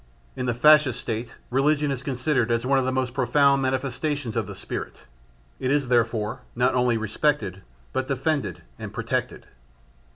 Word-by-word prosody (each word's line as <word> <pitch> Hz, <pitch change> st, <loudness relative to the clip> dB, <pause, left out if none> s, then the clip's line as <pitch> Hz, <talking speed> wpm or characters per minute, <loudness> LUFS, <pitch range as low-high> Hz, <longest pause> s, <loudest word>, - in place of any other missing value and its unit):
In 125 Hz, -, -3 dB
the 120 Hz, -, 0 dB
Fascist 150 Hz, 0 st, +5 dB
State 115 Hz, +1 st, -4 dB, 0.2 s
religion 145 Hz, +2 st, +2 dB
is 130 Hz, -2 st, -3 dB
considered 130 Hz, -1 st, 0 dB
as 115 Hz, +1 st, 0 dB
one 135 Hz, +1 st, +3 dB
of 130 Hz, -, 0 dB
the 130 Hz, -, 0 dB
most 130 Hz, -2 st, -1 dB
profound 140 Hz, +2 st, +3 dB
manifestations 130 Hz, 0 st, -2 dB
of -, -, -1 dB
the -, -, -7 dB
spirit; -, -, -6 dB, 0.6 s
it 130 Hz, -, -1 dB
is 140 Hz, -2 st, +1 dB
therefore 115 Hz, 0 st, +1 dB
not 125 Hz, +2 st, +2 dB
only 125 Hz, -2 st, +2 dB
respected, 110 Hz, -, -1 dB, 0.3 s
but 130 Hz, 0 st, -1 dB
defended 135 Hz, -, -1 dB, 0.2 s
and -, -, -6 dB
protected. -, -, -3 dB
130 Hz, 160 wpm, -25 LUFS, 120-140 Hz, 0.6 s, Fascist